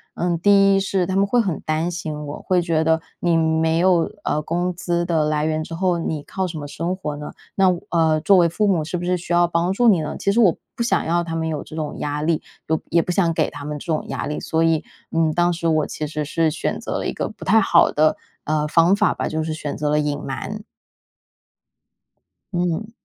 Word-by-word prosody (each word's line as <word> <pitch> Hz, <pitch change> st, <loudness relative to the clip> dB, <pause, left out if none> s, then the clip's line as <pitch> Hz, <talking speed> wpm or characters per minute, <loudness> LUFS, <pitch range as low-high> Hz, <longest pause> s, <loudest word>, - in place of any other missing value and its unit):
嗯， 175 Hz, -1 st, -1 dB
第 195 Hz, +1 st, +5 dB
一 -, -, +3 dB
是 195 Hz, -1 st, 0 dB
他 190 Hz, +2 st, -2 dB
们 200 Hz, +1 st, +3 dB
会 245 Hz, +4 st, +2 dB
很 190 Hz, -9 st, 0 dB
担 155 Hz, +3 st, -1 dB
心 155 Hz, -3 st, -5 dB
我， 145 Hz, +1 st, -7 dB
会 185 Hz, -1 st, +1 dB
觉 165 Hz, -2 st, +1 dB
得 160 Hz, 0 st, +2 dB, 0.2 s
你 170 Hz, -1 st, +2 dB
没 160 Hz, 0 st, +2 dB
有 175 Hz, -2 st, +3 dB
呃 150 Hz, -, 0 dB
工 175 Hz, +3 st, -1 dB
资 175 Hz, 0 st, -1 dB
的 165 Hz, -3 st, +1 dB
来 150 Hz, 0 st, 0 dB
源 155 Hz, 0 st, -1 dB
之 165 Hz, -, -7 dB
后， 180 Hz, -1 st, +1 dB
你 155 Hz, -3 st, -3 dB
靠 190 Hz, -1 st, -3 dB
什 165 Hz, -2 st, -6 dB
么 145 Hz, -, -5 dB
生 170 Hz, +5 st, -3 dB
活 150 Hz, -6 st, -5 dB
呢？ 150 Hz, 0 st, -7 dB, 0.2 s
那 195 Hz, -1 st, +4 dB, 0.2 s
呃。 160 Hz, -2 st, +3 dB
作 195 Hz, +3 st, +5 dB
为 170 Hz, -1 st, +4 dB
父 210 Hz, +5 st, 0 dB
母 175 Hz, -6 st, +2 dB
是 175 Hz, +3 st, -3 dB
不 175 Hz, -, -4 dB
是 180 Hz, +1 st, +1 dB
需 175 Hz, -, -9 dB
要 175 Hz, 0 st, +5 dB
帮 170 Hz, +2 st, 0 dB
助 240 Hz, +3 st, +2 dB
你 185 Hz, -7 st, +5 dB
呢？ 150 Hz, -, -4 dB
其 200 Hz, -, 0 dB
实 220 Hz, -, +1 dB
我 190 Hz, -8 st, +4 dB, 0.2 s
不 -, -, -5 dB
想 235 Hz, -, +1 dB
要 170 Hz, +1 st, +1 dB
他 165 Hz, -1 st, -5 dB
们 160 Hz, 0 st, -1 dB
有 155 Hz, -3 st, -3 dB
这 -, -, -11 dB
种 155 Hz, -2 st, -4 dB
压 150 Hz, +1 st, -2 dB
力， 160 Hz, -1 st, +1 dB, 0.3 s
又 160 Hz, 0 st, 0 dB
也 170 Hz, -, +3 dB
不 180 Hz, -, -3 dB
想 175 Hz, -2 st, +2 dB
给 160 Hz, -1 st, +1 dB
他 145 Hz, -, -8 dB
们 150 Hz, +1 st, -4 dB
这 -, -, -10 dB
种 160 Hz, -3 st, -2 dB
压 -, -, -4 dB
力。 150 Hz, +2 st, -3 dB
所 160 Hz, 0 st, 0 dB
以， 165 Hz, -1 st, +2 dB, 0.3 s
嗯， 165 Hz, -1 st, +2 dB
当 175 Hz, 0 st, +2 dB
时 170 Hz, 0 st, -2 dB
我 155 Hz, -2 st, +2 dB
其 155 Hz, -, -4 dB
实 150 Hz, 0 st, -3 dB
是 160 Hz, +1 st, +1 dB
选 155 Hz, -, -3 dB
择 -, -, -3 dB
了 -, -, -3 dB
一 -, -, -2 dB
个 -, -, -3 dB
不 -, -, -11 dB
太 220 Hz, +3 st, +5 dB
好 170 Hz, -4 st, +4 dB
的 155 Hz, +1 st, +2 dB, 0.3 s
呃， 150 Hz, 0 st, 0 dB
方 170 Hz, +5 st, +4 dB
法 210 Hz, 0 st, +2 dB
吧， -, -, -2 dB
就 155 Hz, -, -2 dB
是 160 Hz, 0 st, -3 dB
选 150 Hz, -2 st, -5 dB
择 150 Hz, 0 st, -1 dB
了 150 Hz, 0 st, +2 dB
隐 145 Hz, -1 st, -1 dB
瞒。 205 Hz, +10 st, -5 dB, 1.9 s
嗯。 180 Hz, +5 st, -1 dB
165 Hz, 265 characters per minute, -21 LUFS, 155-180 Hz, 1.9 s, 第